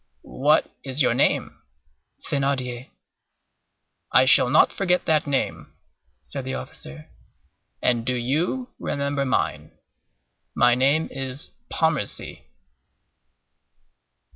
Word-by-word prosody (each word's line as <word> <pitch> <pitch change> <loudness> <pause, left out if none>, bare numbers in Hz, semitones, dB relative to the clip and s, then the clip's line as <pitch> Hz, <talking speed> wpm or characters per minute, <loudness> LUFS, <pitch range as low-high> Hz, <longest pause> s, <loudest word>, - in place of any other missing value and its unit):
"What 150 +4 +1
is 135 +1 0
your - - +3
name?" - - 0 0.7
"Thénardier." 130 -3 -2 1.2
"I 130 - +6
shall 130 -1 +6
not 150 - +4
forget 180 -2 0
that 155 -2 +2
name," 140 -2 -2 0.5
said - - -6
the 65 - -4
officer; 70 +3 -9 0.8
"and 120 -2 +2
do 125 +1 -1
you 160 - -1
remember 140 -1 -2
mine. 130 - -2 0.8
My 120 0 +5
name 140 +6 +2
is 135 +1 -5 0.2
Pontmercy." 155 - -2
135 Hz, 95 wpm, -24 LUFS, 125-150 Hz, 1.2 s, I